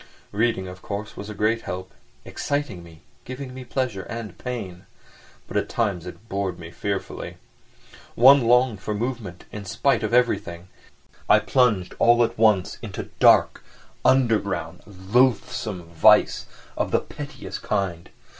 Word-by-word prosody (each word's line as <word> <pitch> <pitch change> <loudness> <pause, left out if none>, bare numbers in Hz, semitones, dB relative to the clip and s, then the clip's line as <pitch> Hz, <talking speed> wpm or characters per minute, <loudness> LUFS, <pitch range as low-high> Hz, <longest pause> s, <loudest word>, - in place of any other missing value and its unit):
Reading, 105 -3 0
of 90 0 -10
course, 105 +1 -6
was 100 - -8
a 105 - -7
great 110 +3 +1
help—exciting 95 - -5
me, 85 -1 -15 0.2
giving 130 0 -7
me 130 0 -8
pleasure 125 -5 -2
and 115 0 -7
pain. 100 -8 -6 0.6
But - - -3
at - - -1
times 100 -7 -1
it 100 +5 -11
bored 95 -3 -2
me 80 -1 -10
fearfully. 100 +1 -4 0.8
One 130 0 +7
longed 125 -4 +3
for 105 +2 -3
movement 110 -6 -5
in 105 - -7
spite 135 +7 +1
of 110 - -2
everything, 120 -8 +1
and 90 - -20 0.6
I - - +8
plunged 115 -9 +1
all 120 0 +5
at 115 0 -1
once 105 -5 +2
into - - -7
dark, - - +5 0.4
underground, 115 -7 +1
loathsome 105 0 0
vice 85 -1 +4 0.3
of - - -1
the - - +2
pettiest - - -8
kind. 85 -4 -2
105 Hz, 140 wpm, -24 LUFS, 95-120 Hz, 0.8 s, I